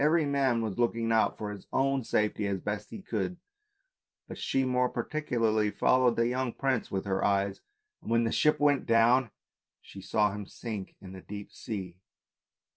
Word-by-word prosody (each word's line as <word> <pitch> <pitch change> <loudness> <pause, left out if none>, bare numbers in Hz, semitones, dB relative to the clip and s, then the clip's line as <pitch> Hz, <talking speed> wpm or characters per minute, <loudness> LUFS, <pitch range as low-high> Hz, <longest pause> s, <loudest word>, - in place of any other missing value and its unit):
Every 155 +1 +4
man 135 -4 +1
was 110 0 -4
looking 115 -1 +1
out 110 -1 +2
for 105 -1 -4
his 100 -2 -10
own 135 -1 +1
safety 105 -1 0
as 100 -1 -1
best 105 +2 -4
he 195 - -9
could, 180 -1 -2 0.9
but - - -7
she 135 0 0
more 125 0 +2
particularly 115 -8 0
followed 125 +2 +3
the 115 0 +2
young 125 -1 -1
prince 135 -3 -1
with 95 0 -3
her 95 -1 -1
eyes, 100 -1 +1 0.4
and - - -9
when 115 0 +3
the 115 - 0
ship 150 -1 +3
went 145 -2 +2
down 115 +2 +4 0.5
she 95 - -12
saw 105 +1 +1
him 105 0 -6
sink 105 -5 -6
in 95 - -10
the 95 - -9
deep 100 +1 -8
sea. 95 -5 -6
115 Hz, 180 wpm, -29 LUFS, 105-130 Hz, 0.9 s, Every